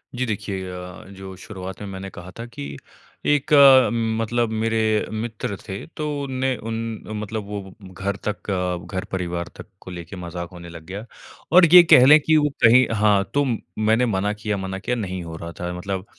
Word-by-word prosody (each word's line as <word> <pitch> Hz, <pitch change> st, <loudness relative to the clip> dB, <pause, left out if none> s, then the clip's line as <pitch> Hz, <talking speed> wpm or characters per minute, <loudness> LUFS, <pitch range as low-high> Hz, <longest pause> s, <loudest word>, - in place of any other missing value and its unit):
जी 130 Hz, +1 st, -1 dB
देखिए 100 Hz, -4 st, -4 dB
अ, 90 Hz, 0 st, -9 dB
जो 95 Hz, -1 st, -10 dB
शुरुआत 95 Hz, -1 st, -8 dB
में 105 Hz, -, -6 dB
मैंने 95 Hz, 0 st, -7 dB
कहा 90 Hz, 0 st, -11 dB
था 115 Hz, -, -5 dB
कि 70 Hz, -12 st, -8 dB, 0.5 s
एक 145 Hz, +1 st, +1 dB, 0.7 s
मतलब 120 Hz, +1 st, 0 dB
मेरे 110 Hz, 0 st, 0 dB, 0.3 s
मित्र 110 Hz, -2 st, -4 dB
थे। 95 Hz, -1 st, -6 dB
तो 150 Hz, -, -2 dB, 0.2 s
उन 135 Hz, -, -5 dB
ने 130 Hz, 0 st, +1 dB
उन 115 Hz, +1 st, -5 dB, 0.5 s
मतलब 105 Hz, +1 st, -4 dB
वो 100 Hz, -2 st, -7 dB, 0.2 s
घर 95 Hz, +3 st, -3 dB
तक 105 Hz, 0 st, -4 dB, 0.4 s
घर 95 Hz, -1 st, -2 dB
परिवार 90 Hz, -2 st, -3 dB
तक -, -, -10 dB
को 95 Hz, -, -10 dB
लेके 85 Hz, +2 st, -8 dB
मज़ाक 85 Hz, -1 st, -6 dB
होने 85 Hz, -1 st, -10 dB
लग 85 Hz, -2 st, -11 dB
गया। 100 Hz, +5 st, -7 dB, 0.5 s
और 180 Hz, +1 st, +8 dB
ये 180 Hz, -, +12 dB
कह 130 Hz, -6 st, +7 dB
लें 150 Hz, +3 st, +8 dB
कि 160 Hz, +1 st, +2 dB
वो 150 Hz, -1 st, +3 dB
कहीं 120 Hz, +2 st, +7 dB
हाँ, 105 Hz, -2 st, +3 dB
तो 145 Hz, -, +3 dB
मैंने 110 Hz, -1 st, 0 dB
मना 105 Hz, -2 st, 0 dB
किया 105 Hz, -1 st, -3 dB
मना 95 Hz, 0 st, -4 dB
किया, 125 Hz, +5 st, -2 dB
नहीं 95 Hz, -6 st, -4 dB
हो 80 Hz, -1 st, -8 dB
रहा 85 Hz, +1 st, -7 dB
था 90 Hz, 0 st, -3 dB
मतलब। 95 Hz, +1 st, -4 dB
100 Hz, 190 wpm, -22 LUFS, 95-115 Hz, 0.7 s, ये